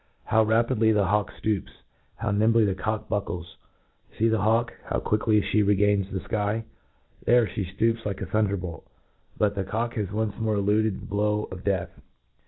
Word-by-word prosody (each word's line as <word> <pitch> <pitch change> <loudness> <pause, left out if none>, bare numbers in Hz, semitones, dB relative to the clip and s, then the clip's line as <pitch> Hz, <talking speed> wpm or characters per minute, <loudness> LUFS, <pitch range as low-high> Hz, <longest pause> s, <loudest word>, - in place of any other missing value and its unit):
How 110 - +3
rapidly 110 +1 +3
the 105 -2 +3
hawk 105 +2 +1
ftoops— 105 -4 -2 0.5
Jiowniinbly 110 +2 +3
the 100 - +1
cock 110 +3 -3
buckles 90 -5 -4 0.6
WScc 115 +1 +3
the 110 - +2
hawk! 115 +2 +2
how - - -1
quickly 105 0 +2
flie 105 - +1
regains 100 -1 +2
the 95 - -3
iky! 105 +3 -1 0.6
dicrc 120 -3 +5
(he 95 +2 -3
(iopps 115 +5 0
like 100 -2 -3
a - - -3
thunderbolt 95 -3 -2 0.3
!— - - -35
but 105 -1 +2
the 100 -1 -2
cock 115 +5 -2
has 105 -3 -2
once 105 0 -1
more 110 -1 0
eluded 105 +1 +1
the - - -9
blow 105 +1 0
of 90 -1 -8
death 95 -3 -1
105 Hz, 175 wpm, -26 LUFS, 100-110 Hz, 0.6 s, dicrc